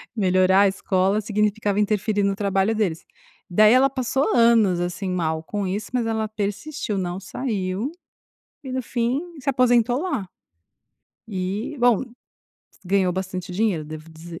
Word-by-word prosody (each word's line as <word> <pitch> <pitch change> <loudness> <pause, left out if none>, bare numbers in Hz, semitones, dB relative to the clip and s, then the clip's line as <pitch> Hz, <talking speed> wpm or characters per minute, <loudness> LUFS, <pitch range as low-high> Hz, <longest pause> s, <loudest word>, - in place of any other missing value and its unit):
Melhorar 185 -1 +4
a 200 - +6
escola, 190 +1 +1
significava 210 -1 0
interferir 210 0 +1
no 200 0 +1
trabalho 200 +2 +1
deles. 190 -7 -1 0.5
Daí 215 +5 +6
ela 265 +2 +5
passou 265 +1 0
anos, 225 -6 +4
assim, 175 +2 -3
mal 160 -3 -1
com 205 +3 -3
isso, 200 +2 -3
mas 245 -2 0
ela 220 -1 -1
persistiu, 210 +3 -3
não 180 0 -3
saiu 200 +2 -3 0.7
e 265 - -6
no 260 0 -1
fim 240 +3 -1 0.2
se 275 +1 -2
aposentou 245 0 +3
lá. 220 - -2 1.0
E, 200 +9 -3
bom, 240 -3 +4 0.8
ganhou 190 -1 +2
bastante 185 -1 -4
dinheiro, 190 -4 0
devo 155 +1 -9
dizer, 165 +1 -10
205 Hz, 140 wpm, -23 LUFS, 185-230 Hz, 1.0 s, a